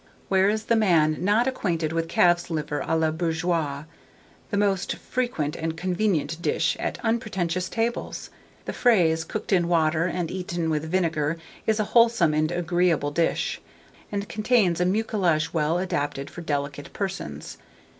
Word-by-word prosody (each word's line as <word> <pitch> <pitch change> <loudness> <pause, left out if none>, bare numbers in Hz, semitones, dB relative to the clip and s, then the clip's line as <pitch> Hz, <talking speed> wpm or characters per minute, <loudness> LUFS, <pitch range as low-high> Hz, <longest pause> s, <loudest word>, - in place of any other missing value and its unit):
Where 190 0 +4
is 215 +1 -1
the 230 - +2
man 170 -8 +3
not 210 +5 +3
acquainted 170 -11 -1
with 165 0 -1
calf's 175 +1 +3
liver 150 -2 -2
à 160 - +1
la 160 -1 +2
bourgeoise, 160 -3 -1 0.6
the 205 - -1
most 200 -2 +1
frequent 240 - -2
and 160 0 -3
convenient 175 -3 -1
dish - - +1
at - - -2
unpretentious 185 -6 -1
tables? 230 +1 -3 0.3
The - - -4
fraise, 170 -10 +3
cooked 205 +5 -4
in 175 -2 +3
water, 165 -1 +2
and 175 -2 -2
eaten 175 -3 -2
with 155 +1 -2
vinegar, 165 -3 0 0.3
is 220 0 +2
a - - +3
wholesome 230 -9 +5
and 155 +1 +1
agreeable 175 -3 +1
dish, 165 +2 0 0.5
and 200 0 -3
contains 210 -5 +2
a - - +3
mucilage 185 -5 +1
well 160 +1 +1
adapted 145 -6 -2
for 175 - -8
delicate 145 -2 -3
persons. 75 - -5
175 Hz, 150 wpm, -25 LUFS, 160-200 Hz, 0.6 s, wholesome